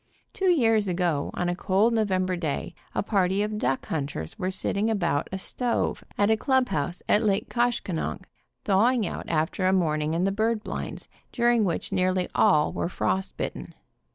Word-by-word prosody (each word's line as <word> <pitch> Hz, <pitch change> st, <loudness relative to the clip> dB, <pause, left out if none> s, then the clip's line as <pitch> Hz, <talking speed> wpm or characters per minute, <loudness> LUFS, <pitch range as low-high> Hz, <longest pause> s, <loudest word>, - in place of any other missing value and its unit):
Two 385 Hz, -3 st, +1 dB
years 225 Hz, -, +3 dB
ago, 175 Hz, -5 st, 0 dB
on 180 Hz, -, -1 dB
a 175 Hz, -, 0 dB
cold 200 Hz, +5 st, +2 dB
November 185 Hz, -4 st, +1 dB
day, 160 Hz, -5 st, -3 dB, 0.2 s
a -, -, +1 dB
party 195 Hz, -1 st, +1 dB
of 210 Hz, 0 st, -3 dB
duck 135 Hz, -8 st, -1 dB
hunters 140 Hz, -, -4 dB
were 185 Hz, -, -1 dB
sitting 200 Hz, +3 st, 0 dB
about 170 Hz, -9 st, 0 dB
a 190 Hz, -, -2 dB
stove 240 Hz, +5 st, -1 dB
at 205 Hz, +1 st, +3 dB
a -, -, +5 dB
clubhouse 215 Hz, -, 0 dB
at 210 Hz, -, +4 dB
Lake 205 Hz, -3 st, 0 dB
Koshkonong, 230 Hz, -, -1 dB, 0.4 s
thawing 220 Hz, +4 st, +3 dB
out -, -, -5 dB
after 160 Hz, +4 st, 0 dB
a -, -, +4 dB
morning 155 Hz, -4 st, +1 dB
in 170 Hz, -, +1 dB
the 195 Hz, -, +2 dB
duck 220 Hz, +2 st, 0 dB
blinds, -, -, -6 dB, 0.2 s
during 235 Hz, -2 st, +3 dB
which 175 Hz, +2 st, -2 dB
nearly 185 Hz, -1 st, +1 dB
all 150 Hz, 0 st, +3 dB
were -, -, -2 dB
frost 190 Hz, +1 st, -2 dB
bitten. -, -, -5 dB
190 Hz, 170 wpm, -26 LUFS, 175-220 Hz, 0.4 s, a